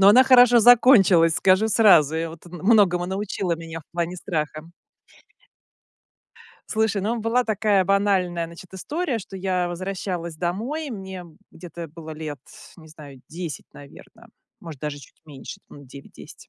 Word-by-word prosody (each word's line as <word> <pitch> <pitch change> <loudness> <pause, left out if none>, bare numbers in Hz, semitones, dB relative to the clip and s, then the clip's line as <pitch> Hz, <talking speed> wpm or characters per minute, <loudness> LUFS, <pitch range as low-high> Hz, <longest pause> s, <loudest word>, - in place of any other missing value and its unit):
но 195 - +7
она 250 +5 +7
хорошо 245 -2 +6
закончилась, 205 -9 +5
скажу 190 +5 +3
сразу. 195 -9 +4
И 165 +1 -2
вот 165 +1 -12
многому 180 0 +2
научила 190 -2 -3
меня 165 0 -8
в - - -27
плане 175 +1 -3
страха. 155 -2 -5 2.0
Слушай, 220 -2 -1
ну, 230 +4 -2
была 230 +3 0
такая 210 -3 +1
банальная, 190 -3 0
значит, 170 +2 -14
история, 295 - -3
что 195 -1 -10
я 185 -2 -1
возвращалась 175 -2 -5
домой. 230 - -4
Мне 190 -4 -8 0.3
где-то 170 -1 -10
было 160 +1 -11
лет, 155 -2 -7 0.4
не 160 -2 -16
знаю, 145 -4 -14
10, 170 -2 -7
наверно, 220 - -16 0.3
может, 160 -6 -10
даже 150 -1 -5
чуть 140 - -18
меньше, 145 -4 -11
там, 145 -1 -14
9-10. 140 +2 -14
180 Hz, 140 wpm, -23 LUFS, 165-210 Hz, 2.0 s, но